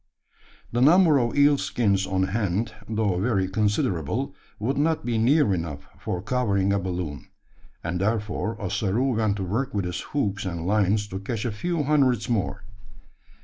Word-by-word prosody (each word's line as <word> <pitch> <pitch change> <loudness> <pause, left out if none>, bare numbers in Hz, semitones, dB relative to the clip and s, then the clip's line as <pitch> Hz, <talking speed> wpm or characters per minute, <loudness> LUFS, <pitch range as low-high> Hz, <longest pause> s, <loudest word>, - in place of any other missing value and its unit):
The 120 - 0
number 160 +1 +6
of 120 +2 -1
eel 145 0 +5
skins 100 -5 +1
on 95 0 +1
hand, 105 +1 -1 0.2
though 105 -5 0
very 100 -3 +1
considerable, 105 - 0 0.2
would 125 +6 -1
not 160 +2 +1
be 120 -2 0
near 130 -1 +4
enough 75 -5 -4
for 90 0 -4
covering 100 -6 +1
a 100 - +1
balloon; 90 -7 -4 0.6
and 90 +2 -2
therefore 110 +1 -1
Ossaroo 110 +5 0
went 110 -3 +1
to 100 - -3
work 110 +7 -2
with 100 -2 0
his 90 -1 -3
hooks 105 -8 -2
and 85 -4 -4
lines 105 +1 +2
to 95 - -4
catch 110 +3 -4
a 120 - 0
few 165 +9 -2
hundreds 130 -7 +2
more. 100 -4 -1
105 Hz, 160 wpm, -25 LUFS, 95-125 Hz, 0.6 s, number